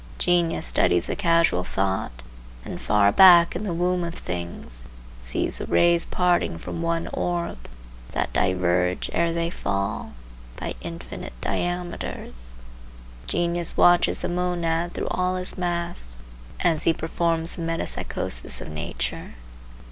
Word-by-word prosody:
Genius 175 Hz, -2 st, +1 dB
studies 85 Hz, +8 st, +2 dB
the -, -, -2 dB
causal 165 Hz, -, +2 dB
thought, 95 Hz, -11 st, -2 dB, 0.4 s
and -, -, -6 dB
far 105 Hz, -1 st, +3 dB
back 175 Hz, -, +7 dB
in 175 Hz, -, -3 dB
the 210 Hz, -4 st, -3 dB
womb 180 Hz, +1 st, 0 dB
of 170 Hz, 0 st, -5 dB
things 85 Hz, -9 st, -6 dB, 0.3 s
sees -, -, -2 dB
the -, -, -5 dB
rays 170 Hz, 0 st, +4 dB
parting 180 Hz, -, +1 dB
from 165 Hz, -, -6 dB
one 165 Hz, 0 st, -1 dB
orb, 170 Hz, -, -3 dB, 0.4 s
that -, -, -2 dB
diverge, 90 Hz, -1 st, +1 dB
ere 170 Hz, 0 st, +2 dB
they 170 Hz, 0 st, -1 dB
fall, 100 Hz, -, -3 dB, 0.4 s
by -, -, -4 dB
infinite 85 Hz, -6 st, -7 dB
diameters. 175 Hz, -, -3 dB, 0.8 s
Genius 175 Hz, -1 st, -1 dB
watches 175 Hz, 0 st, +4 dB
the -, -, 0 dB
monad 175 Hz, -1 st, -1 dB
through -, -, -3 dB
all 185 Hz, 0 st, 0 dB
his 180 Hz, 0 st, -4 dB
masks 170 Hz, -, -3 dB, 0.4 s
as 165 Hz, -3 st, +1 dB
he 165 Hz, -, +5 dB
performs 165 Hz, +1 st, -1 dB
the -, -, -6 dB
metempsychosis 165 Hz, -, +1 dB
of -, -, -7 dB
nature. 65 Hz, -5 st, -4 dB
165 Hz, 130 wpm, -24 LUFS, -, 0.8 s, back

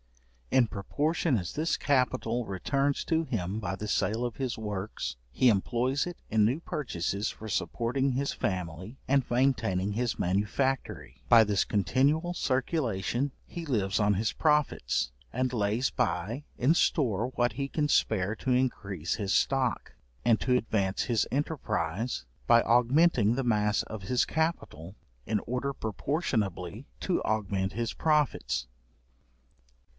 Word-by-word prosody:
In 125 Hz, -3 st, +4 dB
proportion 145 Hz, -, 0 dB
as 90 Hz, -3 st, -4 dB
this 160 Hz, +3 st, 0 dB
capital 125 Hz, -3 st, +1 dB
returns 135 Hz, +9 st, -1 dB
to 165 Hz, -1 st, +1 dB
him 105 Hz, -, -3 dB
by 95 Hz, -3 st, -3 dB
the 105 Hz, +2 st, -6 dB
sale 110 Hz, +3 st, 0 dB
of 120 Hz, -, -4 dB
his 130 Hz, -3 st, -3 dB
works, 105 Hz, -, -4 dB, 0.2 s
he 125 Hz, -, +3 dB
employs 120 Hz, +6 st, +2 dB
it 175 Hz, -1 st, -6 dB
in 110 Hz, -1 st, +3 dB
new 125 Hz, +8 st, +2 dB
purchases 100 Hz, -, -2 dB
for 110 Hz, -, -8 dB
supporting 125 Hz, +6 st, 0 dB
his 140 Hz, +2 st, -1 dB
family 95 Hz, -, -4 dB
and 135 Hz, 0 st, +3 dB
maintaining 110 Hz, -7 st, +1 dB
his 120 Hz, +2 st, -1 dB
manufactory; 105 Hz, -, -1 dB
by 115 Hz, -1 st, +8 dB
this 100 Hz, -2 st, +1 dB
continual 140 Hz, -, +1 dB
circulation, 130 Hz, -, -1 dB
he 170 Hz, -, -7 dB
lives 105 Hz, -8 st, 0 dB
on 105 Hz, -1 st, +3 dB
his 105 Hz, +3 st, 0 dB
profits, 150 Hz, -, +1 dB, 0.2 s
and 130 Hz, 0 st, -1 dB
lays 110 Hz, +3 st, +1 dB
by 95 Hz, -, -1 dB
in 130 Hz, +6 st, +4 dB
store 120 Hz, -, +1 dB
what 120 Hz, -2 st, +1 dB
he 135 Hz, +3 st, -3 dB
can 150 Hz, 0 st, 0 dB
spare 105 Hz, -7 st, +1 dB
to 130 Hz, -, -2 dB
increase 100 Hz, -10 st, 0 dB
his 100 Hz, -3 st, -3 dB
stock, 130 Hz, -1 st, +1 dB, 0.3 s
and 115 Hz, -2 st, +4 dB
to 125 Hz, -1 st, +3 dB
advance 100 Hz, -5 st, 0 dB
his 115 Hz, -3 st, +1 dB
enterprize 115 Hz, -, -2 dB, 0.2 s
by 115 Hz, 0 st, +7 dB
augmenting 120 Hz, -1 st, +4 dB
the 135 Hz, -, -1 dB
mass 105 Hz, -2 st, +2 dB
of 110 Hz, -2 st, -7 dB
his 125 Hz, +6 st, +1 dB
capital, 160 Hz, -, -2 dB, 0.3 s
in 105 Hz, 0 st, +1 dB
order 125 Hz, +3 st, -2 dB
proportionably 110 Hz, -, -2 dB
to 185 Hz, -, 0 dB
augment 100 Hz, -3 st, -1 dB
his 115 Hz, +2 st, -2 dB
profits. 145 Hz, -, +1 dB
115 Hz, 140 wpm, -29 LUFS, 100-135 Hz, 0.3 s, by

